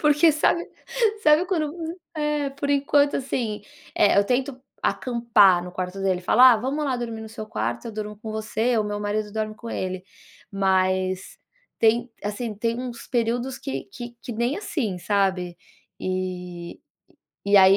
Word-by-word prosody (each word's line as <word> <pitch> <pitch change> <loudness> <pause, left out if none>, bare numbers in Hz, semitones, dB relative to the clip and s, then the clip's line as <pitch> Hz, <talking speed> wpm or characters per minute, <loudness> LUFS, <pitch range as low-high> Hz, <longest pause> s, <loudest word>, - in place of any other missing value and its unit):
porque, 300 +2 +5
sabe 340 +3 +1 0.5
sabe 305 +4 +5
quando, 320 -6 0
v 335 0 -5 0.2
é 300 -2 0
por 280 +1 -4
enquanto 285 0 +3
assim, 230 -6 -2 0.3
eh, 200 - +5
eu 200 - +5
tento 255 +3 -1 0.2
acampar 225 -7 +4
no 180 - -8
quarto 185 +1 -4
dele, 185 -2 +1
falar: 250 +7 +7
"Ah, - - +3
vamos 270 +7 -2
lá 265 -3 0
dormir 230 -2 -4
no 220 - -8
seu 215 -1 -7
quarto, 115 - -3
eu 225 - -5
durmo 210 0 -5
com 220 0 -7
você", 220 +2 0
ou 215 - +2
o - - -3
meu 205 0 -3
marido 210 0 -2
dorme 215 0 -2
com 230 +1 -8
ele. 185 0 -3 0.5
Mas, 185 -1 +1 0.4
tem 235 +2 +3
assim, 210 +2 -3
tem 230 +3 -1
uns 245 -2 -6
períodos 245 +2 0
que 135 0 -4
que 240 -1 -8
que 245 - -5
nem 240 +6 0
assim, 235 - -2
sabe. 185 -2 0 0.4
E 180 -2 -4 0.7
e 200 0 +4
aí, 190 0 +8
220 Hz, 170 wpm, -24 LUFS, 195-260 Hz, 0.7 s, aí